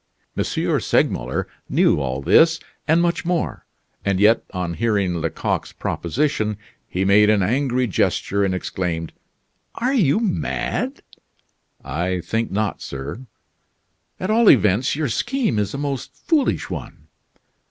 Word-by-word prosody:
M. - - 0
Segmuller 60 +1 0 0.2
knew - - +3
all 70 -1 -3
this, 160 - +5 0.3
and 165 +2 +4
much 170 0 0
more, 175 -1 -2 0.4
and 100 -2 0
yet, 110 +3 +5
on 90 -2 -3
hearing 100 -4 0
Lecoq's 80 -1 -2
proposition, 110 - -1 0.3
he 95 +2 -1
made 105 +2 +5
an 105 -2 +3
angry 125 +4 +1
gesture 100 -1 0
and 95 -1 +1
exclaimed: 85 -3 -3 0.6
"Are 250 +3 0
you 205 - +3
mad?" 65 - -2 0.8
"I 90 +6 -1
think 115 +5 -2
not, 105 +1 -2
sir." 70 - -7 0.9
"At 185 +3 -1
all 230 0 +5
events 110 +1 +4
your 150 0 -1
scheme 225 - 0
is 105 - -1
a - - -3
most 140 -2 -4
foolish 310 -5 0
one!" - - -7
105 Hz, 130 wpm, -21 LUFS, 90-145 Hz, 0.9 s, this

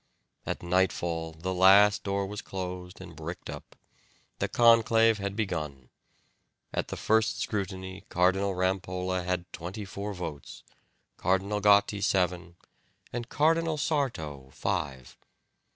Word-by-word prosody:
At - - -3
nightfall 85 -2 0
the 90 +4 -4
last 100 +3 +6
door 100 0 -1
was 105 +1 -6
closed 90 -1 -6
and - - -10
bricked - - -6
up; - - -10 0.6
the - - 0
conclave 115 -1 +5
had 100 0 -3
begun. 75 - -3 0.8
At - - -1
the - - -5
first 110 0 +2
scrutiny 95 -2 -4
Cardinal 95 +2 +2
Rampolla 95 0 -1
had 90 0 -3
twenty 95 +5 -6
four 100 +1 -5
votes, 75 -6 -7 0.5
Cardinal 95 +3 0
Gotti 100 0 +4
seven, 90 -3 0 0.6
and 120 0 -4
Cardinal 160 +1 +2
Sarto 80 - -2
five. 65 -3 -3
95 Hz, 120 wpm, -28 LUFS, 90-105 Hz, 0.8 s, last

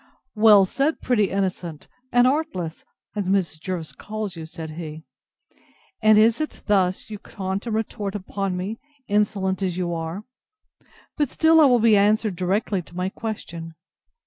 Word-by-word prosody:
Well 210 -3 +7
said, 280 +10 0
pretty 215 -6 +1
innocent 180 -5 -3 0.2
and 245 0 +5
artless! 255 - -1 0.3
as 200 -3 -2
Mrs. 185 -5 0
Jervis 170 -2 -4
calls 215 -3 -5
you, 160 -1 -7
said 160 -1 -7
he; 155 -1 -7 1.0
and 215 -1 +6
is 225 +6 +4
it 310 - -5
thus 190 0 +1
you 210 - -6
taunt 190 +3 -5
and 220 - -1
retort 210 -2 -3
upon 195 -1 -3
me, 200 +5 -4 0.3
insolent 200 -2 0
as 180 -2 -1
you 175 -2 -1
are! 165 +4 -4 0.9
But 295 -4 +1
still 320 +2 +5
I - - +8
will 250 -3 +5
be 225 -1 +5
answered 210 0 +2
directly 190 +2 0
to 175 - -17
my 180 +1 -1
question. 170 -7 -6
200 Hz, 155 wpm, -23 LUFS, 180-215 Hz, 1.0 s, I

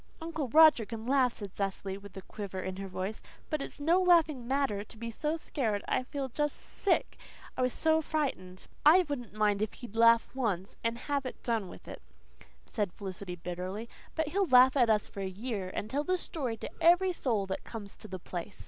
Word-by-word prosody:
"Uncle 320 -4 -3
Roger 310 -4 +7
can 220 +1 -7
laugh," 255 -1 +3
said 200 -3 -8
Cecily, 195 -1 -2
with 200 -1 -11
a 190 - -7
quiver 195 -2 -6
in 185 0 -4
her 195 0 -5
voice, 190 +3 -4 0.3
"but 305 -2 0
it's - - -7
no 335 +6 +3
laughing 315 -9 +4
matter 265 -7 0
to 220 - -14
be 230 +1 -5
so 300 +7 -2
scared. 225 -10 -2
I - - +2
just 255 - -9
feel 285 +1 -1
sick, 390 - -1 0.4
I - - -2
was 255 0 +2
so 320 +3 +2
frightened." 265 -13 -3 0.2
"I 350 +5 +7
wouldn't 245 -7 -5
mind 210 -1 +2
if 215 - -1
he'd 235 -4 -10
laugh 230 0 +6
once 205 -8 -2
and 230 0 0
have 280 -2 -1
it - - -9
done 225 -5 0
with - - -13
it," - - -8 0.6
said 205 -5 -2
Felicity 190 -2 -6
bitterly. 180 +5 -5 0.3
"But 320 -2 0
he'll 390 +3 +1
laugh 255 0 +7
at 245 -4 +4
us 215 -1 +3
for - - -10
a 190 - -2
year, 200 -1 -4
and 205 - -4
tell 280 +6 -1
the 370 +3 +1
story 260 -10 -3
to - - -8
every 355 +2 +5
soul 225 - 0
that 190 0 -4
comes 205 -4 -7
to - - -10
the 185 - -5
place." 180 +2 -6
230 Hz, 210 wpm, -31 LUFS, 200-290 Hz, 0.6 s, Roger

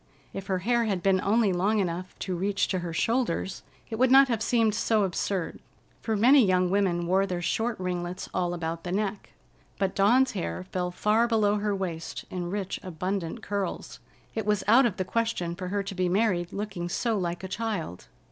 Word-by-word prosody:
If 195 0 -6
her 190 - 0
hair 235 +5 +1
had 195 -5 -1
been 190 -1 +3
only 210 -1 +2
long 200 +5 +1
enough 180 -2 -2
to 185 - -2
reach 195 +2 0
to 185 - 0
her 175 -1 -4
shoulders, 225 0 -1 0.3
it 220 - -5
would 260 0 +4
not 270 +1 +7
have 230 -3 0
seemed 225 -2 +2
so 220 -1 +2
absurd, 185 -1 -2 0.4
for 220 - -1
many 255 +5 +6
young 185 -2 +2
women 185 -4 +1
wore 190 +3 +2
their 180 -2 -2
short 225 +5 -1
ringlets 180 0 -3
all 175 -1 0
about 165 -1 -4
the 175 - -4
neck. 205 +1 -3 0.4
But 195 -1 0
Dawn's 250 +6 +4
hair 185 -2 -4
fell 180 -1 -3
far 215 +6 +2
below 210 -3 +2
her 205 0 -1
waist 170 -4 -5
in 175 -1 -3
rich, 195 0 -3
abundant 185 +3 -4
curls. 200 -2 -4 0.3
It 220 -2 -3
was 210 -2 +1
out 240 +4 +6
of 195 - -5
the 185 - -1
question 225 -5 -1
for 180 +1 -6
her 200 +2 -1
to 195 0 -6
be 185 -1 0
married 180 -3 +1
looking 195 -4 -4
so 230 +5 0
like 175 -2 -2
a - - -3
child. 200 - -4
195 Hz, 195 wpm, -27 LUFS, 180-220 Hz, 0.4 s, not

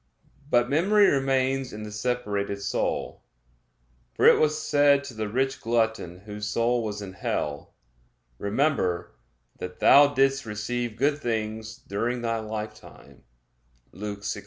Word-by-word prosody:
But 120 -2 +3
memory 195 +9 +4
remains 135 -2 +1
in 105 0 -7
the 105 - -7
separated 105 -3 -2
soul; - - -2 0.9
for - - +2
it - - +7
was 155 0 +2
said 145 -2 +3
to 135 - -8
the 110 -1 -4
rich 135 +4 -1
glutton 110 -6 -1
whose 105 0 -6
soul 115 +2 +1
was 105 -1 -4
in 95 -2 -8
hell: 75 -5 -4 0.6
"Remember 100 - 0 0.5
that 90 0 -6
thou 145 0 +7
didst 135 0 +2
receive 115 +2 -3
good 145 +4 +1
things 110 -2 -3
during 120 +3 -3
thy 115 -1 0
lifetime" 110 0 -8 0.7
(Luke 100 0 -6
16:25). - - -3
115 Hz, 135 wpm, -26 LUFS, 105-135 Hz, 0.9 s, it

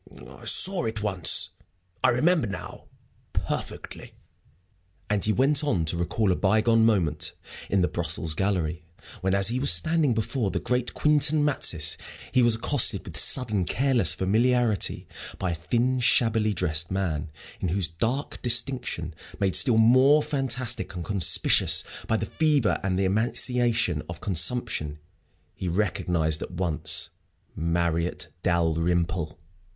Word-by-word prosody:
"I - - -14
saw 190 -9 +4
it 110 -2 -4
once! 95 -5 0 0.5
I - - +5
remember 150 +2 +2
now 100 - -8 0.5
perfectly." - - -5 1.0
And 105 -2 0
he 110 - +1
went 140 +5 +2
on 95 - 0
to 80 - -2
recall 90 +4 -1
a - - +1
bygone 110 +4 +2
moment 80 -8 0 0.4
in 100 - +1
the 90 - +2
Brussels 80 -2 -2
Gallery, 85 -3 -2 0.4
when, 95 +1 0
as 100 +1 +3
he 125 +2 -2
was 140 - +4
standing 145 - +2
before 115 0 -2
the - - -3
great 125 0 -2
Quintin 150 0 +2
Matsys, 85 - +1 0.3
he 130 - +3
was 120 -2 +3
accosted 115 -3 +1
with 85 - -10
sudden 110 - +2
careless 120 - +1
familiarity 115 +1 0 0.3
by 95 -2 -2
a - - -1
thin, 120 +10 -1
shabbily 115 -3 +1
dressed 85 -2 0
man, 85 -6 -3 0.3
in - - -2
whose 90 0 +1
dark 115 - -3
distinction, 120 - -1 0.3
made 95 -2 0
still 125 -5 +4
more 130 +6 +5
fantastic 130 -7 -2
and 85 -2 -6
conspicuous 100 -4 +3 0.2
by 110 - +1
the - - -3
fever 150 -7 +1
and 95 -2 -1
the 95 - 0
emaciation 115 - +1
of 85 0 -7
consumption, 90 -4 0 0.6
he 95 - -6
recognized 85 -4 -1
at - - -5
once 85 -3 -1 0.4
Marriott 85 +1 -1
Dalrymple. 85 -1 -1
100 Hz, 135 wpm, -25 LUFS, 85-125 Hz, 1.0 s, I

